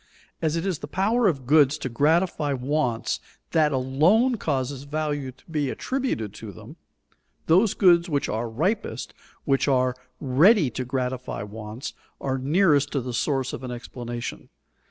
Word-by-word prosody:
As 160 -1 +1
it 165 +2 -2
is 185 -6 -1
the - - -7
power 210 +8 +2
of 140 -8 -1
goods 145 +1 +5
to 140 - -4
gratify 150 +3 +1
wants 130 -2 -1 0.3
that 155 -2 +3
alone 155 - +3
causes 135 -6 -2
value 145 -2 -3
to 130 - -25
be 150 -4 -1
attributed 250 - -2
to 110 -2 -8
them, 90 - -12 0.7
those 190 +6 +4
goods 175 -2 +5
which 145 -3 0
are 115 +2 -2
ripest, 165 - -2 0.3
which 135 -1 +2
are 130 -2 +2 0.2
ready 150 - +4
to 130 - -3
gratify 125 -3 -3
wants, 105 +3 -7 0.3
are 135 -1 -2
nearest 145 0 +3
to 140 - +1
the 125 0 -5
source 135 +1 0
of - - -6
an 130 - -5
explanation. 120 -1 -6
140 Hz, 155 wpm, -25 LUFS, 125-165 Hz, 0.7 s, goods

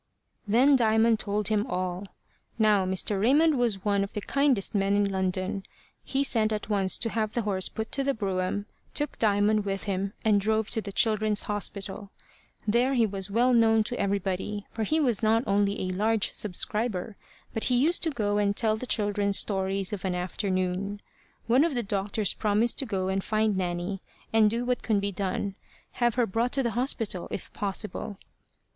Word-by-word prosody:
Then 255 +7 +5
Diamond 225 -2 +3
told 210 0 -1
him 210 -1 +2
all. 180 +1 -3 0.5
Now 210 -4 +3
Mr. 190 +1 0
Raymond 295 +7 +4
was 220 -5 0
one 200 -1 +2
of 195 - -6
the 210 - -3
kindest 275 -4 +1
men 200 -1 +2
in 205 0 +3
London. 190 0 -1 0.4
He 275 +1 0
sent 220 -5 +1
at 210 0 -3
once 195 -3 +1
to 230 - -1
have 215 -2 -1
the 235 - -1
horse 190 -3 0
put 220 0 -5
to 275 - -1
the 275 0 0
brougham, 195 -1 -2 0.3
took 295 -1 -1
Diamond 210 0 +3
with 195 -1 -3
him, 195 0 -2
and 210 -2 +4
drove 220 +1 0
to 225 - 0
the 200 - -7
Children's 215 0 +2
Hospital. 200 -1 -4 0.6
There 245 +5 +2
he 235 -2 +4
was 195 -1 -4
well 240 +5 +3
known 225 -2 +4
to 245 +3 -5
everybody, 200 +1 -2
for 225 - -5
he 310 +9 +1
was 245 -8 +1
not 225 +1 +3
only 200 -1 +1
a 185 0 -2
large 215 +2 +1
subscriber, 210 +1 -2 0.4
but 225 - -1
he 250 - +2
used 315 +8 +2
to 330 - +1
go 210 -7 0
and 200 -1 +1
tell 220 -2 +2
the 255 - -5
children 205 -2 0
stories 195 -1 +1
of 195 - -5
an 185 -2 -1
afternoon. 185 +2 -2 0.5
One 250 +5 +4
of 325 -4 0
the 240 - 0
doctors 200 0 -1
promised 215 +2 +1
to 270 - -2
go 190 -3 -1
and 190 0 -1
find 215 -1 +1
Nanny, 180 +1 -2 0.3
and 220 -1 +5
do 235 +3 -2
what 250 0 0
could 215 -3 +1
be 200 0 -1
done 195 +1 -2 0.5
have 240 -2 +3
her 245 -1 +3
brought 230 +4 -1
to 270 - +1
the 235 - 0
hospital, 225 -7 -2
if - - -6
possible. 205 +1 -4
210 Hz, 190 wpm, -27 LUFS, 195-225 Hz, 0.6 s, Then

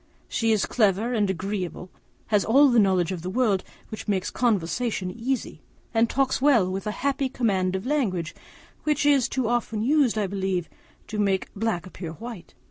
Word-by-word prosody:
She 225 -1 0
is 215 -3 +2
clever 215 +1 +1
and 210 -4 +1
agreeable, 190 -1 -4 0.4
has 210 -3 +3
all 275 +5 +5
that 240 -2 +4
knowledge 190 -4 +3
of 180 -3 -4
the 180 - -4
world 205 -3 +1 0.3
which 215 - -7
makes 190 -3 0
conversation 210 -2 0
easy, 240 +5 -3 0.3
and 230 0 +3
talks 270 -1 +1
very 285 +2 +5
well, 185 -5 +2
with 195 +2 -4
a - - 0
happy 275 -1 +1
command 195 -8 0
of 190 - -4
language, 200 - -1 0.5
which 300 -1 +1
is 280 -4 +4
too 260 -4 -1
often 225 -2 -1
used, 270 -3 +3
I 210 - +1
believe, 190 -2 -2 0.4
to 215 - -5
make 195 -2 0
black 205 -4 -2
appear 175 -3 -7
white. 225 0 -9
215 Hz, 180 wpm, -25 LUFS, 190-245 Hz, 0.5 s, all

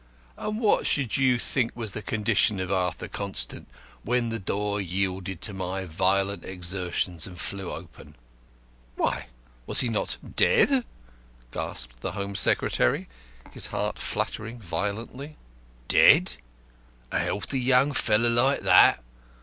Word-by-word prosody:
And 215 +1 -4
what 220 -3 +2
should 135 -6 +1
you 130 -2 +3
think 120 0 -1
was 110 -4 -4
the 105 - -5
condition 105 -1 +1
of 95 0 -3
Arthur 90 -2 -1
Constant 95 -12 -4 0.3
when 120 -1 0
the 115 0 -2
door 100 +1 -1
yielded 95 0 -1
to 105 - -2
my 95 0 -4
violent 95 +3 0
exertions 90 -2 -2
and 90 -2 -10
flew 95 0 -5
open?" - - -11 0.8
"Why, - - -1 0.4
was - - +5
he 125 - 0
not 110 - 0 0.2
dead?" 280 - +4 0.7
gasped - - -3
the - - -4
Home 100 0 -4
Secretary, 60 -11 +1 0.4
his - - -2
heart - - -3
fluttering 115 +3 -3
violently. 110 - -5 0.5
"Dead? - - +6 0.8
A - - 0
young, - - -1
healthy 130 +6 +1
fellow 115 -1 +3
like 125 +4 +3
that! 60 - +5
100 Hz, 130 wpm, -26 LUFS, 95-120 Hz, 0.8 s, Dead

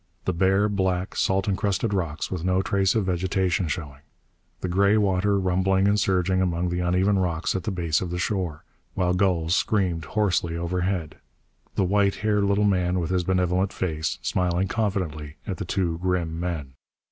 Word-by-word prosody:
The 95 - 0
bare, 95 +4 +3
black, 95 -2 -1
salt 95 +1 +1
encrusted 100 +2 0
rocks 85 -5 -2
with 90 -3 -3
no 95 +1 +1
trace 95 0 +1
of 110 -3 +1
vegetation 95 0 0
showing. 75 -5 -5 0.6
The - - -2
gray 100 +4 +3
water 100 0 +2
rumbling 95 +1 +2
and 105 +1 +3
surging 95 -1 +1
among 90 -1 0
the 90 0 -2
uneven 90 +3 +2
rocks 85 -2 -1
at 95 -3 -3
the - - -1
base 85 -5 0
of 90 - -3
the 90 - -3
shore, 90 -4 -2 0.3
while 90 -2 +1
gulls 90 -3 +2
screamed 90 -9 0
hoarsely 90 -3 0
overhead. 90 -1 -2 0.6
The - - +2
white 100 +1 +2
haired 105 -1 +1
little 100 +1 +2
man 90 -3 +2
with 85 0 -2
his 90 -1 +1
benevolent 90 +1 +1
face, 80 -3 -2
smiling 90 +1 0
confidently 90 -9 -2
at 95 - -4
the 95 - -4
two 85 -2 -1
grim 85 -3 -1
men. 80 -6 -4
95 Hz, 170 wpm, -25 LUFS, 85-95 Hz, 0.6 s, bare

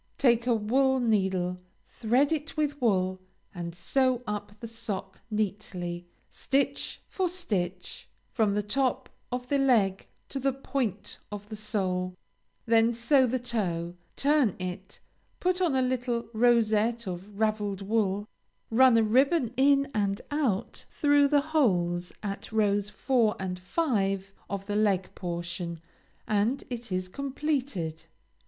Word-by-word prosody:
Take 240 -2 +3
a 240 - +4
wool 265 +5 +2
needle, 190 -6 +1 0.3
thread 250 +6 +1
it 310 0 -2
with 295 -2 -1
wool, 185 -5 +1 0.3
and 170 -2 -6
sew 255 +5 +1
up 205 -1 -5
the 230 - -6
sock 210 -4 -6
neatly, 185 -5 -3 0.2
stitch 275 0 -1
for 375 -2 -1
stitch, 190 - -4 0.2
from 215 -4 +1
the 210 - 0
top 255 +5 0 0.2
of 250 0 -3
the 280 +1 +1
leg 215 -8 +2 0.2
to 275 - -3
the 270 0 +1
point 255 -6 -3
of 205 0 -7
the 220 - -5
sole; 185 -4 -1 0.5
then 230 0 +4
sew 255 +3 +3
the 255 +2 0
toe; 180 -9 -2 0.2
turn 285 - +3
it; 185 +1 -6 0.4
put 365 0 +1
on 335 -7 +2
a 260 - +3
little 250 -2 -1
rosette 230 0 +3
of 190 +3 -7
raveled 210 -3 0
wool; 205 -1 0 0.4
run 250 0 +6
a 225 - +5
ribbon 255 +3 +3
in 275 +1 +4
and 200 -2 0
out 270 -10 -1
through 290 -1 +4
the 290 0 +4
holes 175 - +2
at 200 +1 -5
rows 205 -2 +2
4 225 0 +1
and 185 -1 -3
5, 195 - 0 0.2
of 200 -1 -4
the 205 0 -3
leg 200 -3 +1
portion, 170 -1 -4 0.5
and 215 +6 +1
it 240 -3 -6
is 185 0 -1
completed. 265 - -3
220 Hz, 135 wpm, -28 LUFS, 195-260 Hz, 0.5 s, run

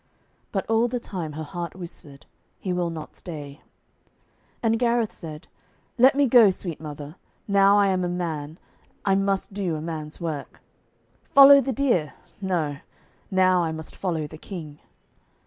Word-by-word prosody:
But 195 -4 -2
all 225 +1 +3
the 245 +1 -2
time 175 -9 -6
her 155 +1 -5
heart 170 +2 -6
whispered, 155 -5 -11 0.3
'He 185 - -2
will 175 -1 0
not 160 -2 -8
stay.' 150 -4 -9 1.0
And 225 0 +2
Gareth 235 -2 +1
said, 155 -3 -9 0.5
'Let 260 +3 +7
me 285 0 +4
go, 240 -4 +7
sweet 175 -4 -4
mother. 150 +1 -8 0.3
Now 200 0 +5
I 200 -1 +4
am 185 -1 +1
a 175 - -1
man, 160 -3 -4 0.5
I 195 - +3
must 195 0 0
do 190 -5 -2
a - - -4
man's 155 -1 -6
work. 160 -4 -5 0.8
"Follow 280 0 +10
the 265 - -2
deer!" 215 - 0 0.3
No; 165 -7 -1 0.5
now 185 -1 +3
I 165 -2 -1
must 160 0 -7
follow 165 -5 -2
the 155 +1 -10
King.' 155 -7 -8
180 Hz, 155 wpm, -25 LUFS, 155-200 Hz, 1.0 s, Follow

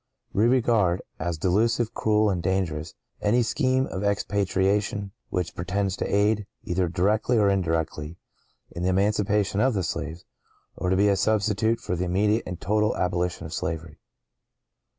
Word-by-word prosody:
(¶ - - -45
29) 110 +4 +3
We 130 - +5
regard, 110 -8 +2 0.2
as 85 0 -2
delusive, 115 +7 +1
cruel, 105 -2 +2
and 90 -2 -1
dangerous, 85 -4 -2 0.3
any 120 +4 +3
scheme 130 +2 +1
of 95 -5 -5
expatriation 100 0 0 0.2
which 90 -1 -2
pretends 95 +2 -1
to - - -2
aid, 105 0 +1 0.2
either 90 0 0
directly 105 +8 +1
or 100 -2 +4
indirectly, 80 -3 -1 0.5
in 85 - -6
the 90 - +1
emancipation 100 +1 +1
of 130 +1 +2
the 95 - 0
slaves, 80 +1 -4 0.5
or 90 - -2
to 95 - +2
be 100 +2 +4
a 100 - +4
substitute 110 +2 +1
for 90 - -3
the 90 +1 -2
immediate 105 +5 +1
and 90 -1 -5
total 105 +1 +1
abolition 90 -1 -1
of - - -7
slavery. 80 -1 -4
100 Hz, 160 wpm, -25 LUFS, 90-105 Hz, 0.5 s, We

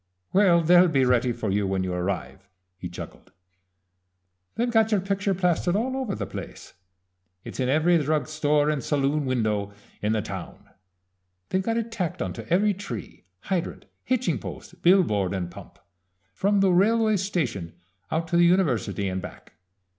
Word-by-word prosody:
"Well, 185 -4 +5
they'll 175 +2 +6
be 135 -6 +2
ready 125 0 +2
for 115 -4 -3
you 100 0 +1
when 95 -1 -1
you 90 -1 -2
arrive," 95 +2 -4 0.3
he - - -7
chuckled. - - -10 1.2
"They've 240 +1 0
got 225 -1 +3
your 210 - +3
picture 195 0 -1
plastered 180 0 +1
all 255 +5 0
over 255 -7 -2
the - - -4
place. - - -9 0.7
It's - - -9
in 130 -1 +1
every 160 +4 +3
drug 155 +1 0
store 150 -1 +1
and 145 -4 -2
saloon 145 +1 0
window 105 -5 -1 0.3
in 105 +1 +1
the 110 -2 0
town. 95 -4 -8 0.8
They've 190 - +1
got 225 +4 -1
it 230 0 -3
tacked 180 -6 -3
onto - - -4
every 200 +4 +3
tree, 135 - -8 0.2
hydrant, 180 -3 -3 0.2
hitching 255 0 0
post, - - -9
billboard, 105 - +3
and 90 -2 -4
pump, - - -12 0.6
from 200 - +2
the 195 -1 +4
railway 215 +4 +3
station 130 - -2 0.4
out 165 +1 -1
to 170 - +2
the 175 - +6
university 140 - +1
and 95 0 -3
back. - - -11
160 Hz, 160 wpm, -25 LUFS, -, 1.2 s, they'll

